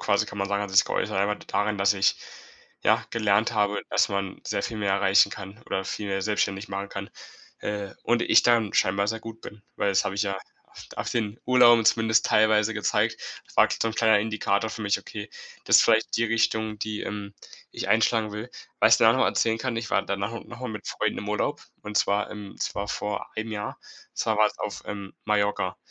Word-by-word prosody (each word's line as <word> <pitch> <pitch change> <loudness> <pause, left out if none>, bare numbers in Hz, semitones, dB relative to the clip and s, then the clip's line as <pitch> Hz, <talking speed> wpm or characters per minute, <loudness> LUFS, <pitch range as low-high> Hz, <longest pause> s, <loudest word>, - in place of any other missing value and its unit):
quasi - - +1
kann 105 - -8
man 100 0 -1
sagen 100 0 0
hat 100 - -5
es 95 - -4
sich - - +7
geäußert - - -2
einfach 105 +1 0
daran, 105 0 -1
dass 100 +1 +3
ich, 95 0 +2 0.7
ja, - - +3
gelernt 110 0 +1
habe, 105 -2 +1
dass - - +3
man 100 -1 -3
sehr 100 - -1
viel 115 - -4
mehr 100 -2 -1
erreichen 100 0 +4
kann 100 +2 -9
oder 95 - -2
viel 105 +1 -4
mehr 95 0 -1
selbstständig 100 -1 -1
machen 100 0 -4
kann, 100 0 -7 0.5
äh, 100 -1 -4
und 120 0 +1
ich - - +5
darin 115 -4 +2
scheinbar 100 +2 +2
sehr 115 +1 -2
gut 115 0 -9
bin. 105 -1 -11
Weil 100 - +1
das 95 - +2
hab - - -2
ich 100 +2 -1
ja 100 -2 -1
a - - -8 0.6
auf - - -3
den 110 -2 -2
Urlauben 120 -2 +6
zumindest 110 0 +3
teilweise 110 0 +3
gezeigt, 105 -2 0 0.4
war - - +6
so 115 - 0
'n 110 - -5
kleiner 110 -2 +4
Indikator 110 0 -1
für 115 - -7
mich: 105 -1 +1
„Okay, 105 0 -8 0.4
das - - +7
ist - - +7
vielleicht 110 0 +2
die 115 - +1
Richtung, 110 -1 0
die, 105 0 -4
ähm, 100 0 -6 0.4
ich - - -5
einschlagen 110 -1 +2
will.“ 105 +3 -6 0.3
Was - - +7
ich - - +1
da - - +6
auch - - +4
noch - - 0
mal - - +4
erzählen 115 0 +1
kann, 120 0 -3
ich 115 0 -4
war 100 - +2
danach 100 +2 -3
no 115 - -6
noch 120 +1 -12
mal 130 - -4
mit 105 -2 -7
Freunden - - -1
im 105 - -6
Urlaub 125 +8 -1 0.2
und 105 0 -6
zwar 100 +1 +1
im 105 -2 -9
das - - -3
war 100 +1 -4
vor 105 -1 -3
einem 110 0 -4
Jahr. 105 -1 -5 0.3
Und - - -43
zwar 110 -2 0
war's 105 0 +2
auf, 100 -5 -5
ähm, 100 -2 -6
Mallorca. 105 -3 0
105 Hz, 225 wpm, -26 LUFS, 100-110 Hz, 0.7 s, sich